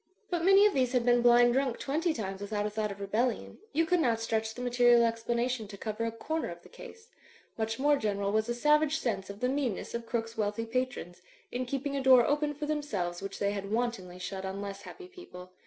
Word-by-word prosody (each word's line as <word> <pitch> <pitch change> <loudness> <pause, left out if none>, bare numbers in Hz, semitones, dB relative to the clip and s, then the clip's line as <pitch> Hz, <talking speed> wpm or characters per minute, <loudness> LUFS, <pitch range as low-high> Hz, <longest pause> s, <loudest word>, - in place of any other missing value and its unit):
■ - - -52 0.3
But 345 -2 0
many 390 +2 +7
of 420 - +4
these 255 -2 +1
had 245 -2 +2
been 245 0 +4
blind 240 0 +6
drunk 260 -2 0
twenty 320 +5 -1
times 195 -8 -5
without 205 0 -2
a 210 - -2
thought 210 -1 -2
of 200 - -9
rebellion; 220 +5 -2
you 330 +2 +2
could 360 +2 +2
not 235 -7 +2
stretch 220 -1 -2
the 250 - -7
material 240 -1 +5
explanation 235 0 -1
to 200 0 -10
cover 215 +2 -3
a 230 - -1
comer 315 +8 -3
of 170 0 -9
the - - -16
case. 460 -1 -13 0.5
Much 225 0 -2
more 290 +2 +3
general 200 -4 -1
was 220 +2 0
a 240 - -1
savage 300 +4 +3
sense 200 -9 -3
of 200 +1 -9
the 250 - +2
meanness 260 -6 -2
of 235 0 -5
Crooke's 225 -1 -3
wealthy 215 +1 -2
patrons, 230 -7 -3 0.3
in 250 0 -3
keeping 275 +2 -3
a 275 - -1
door 260 -2 +6
open 295 0 0
for 295 +1 -4
themselves 210 -14 -2
which 195 0 -6
they 200 0 0
had 200 -1 -5
wantonly 220 -6 -2
shut 190 +1 -5
on 190 +1 -4
less 200 0 -6
happy 370 -2 -11
people. 185 - -12
235 Hz, 230 wpm, -30 LUFS, 205-275 Hz, 0.5 s, many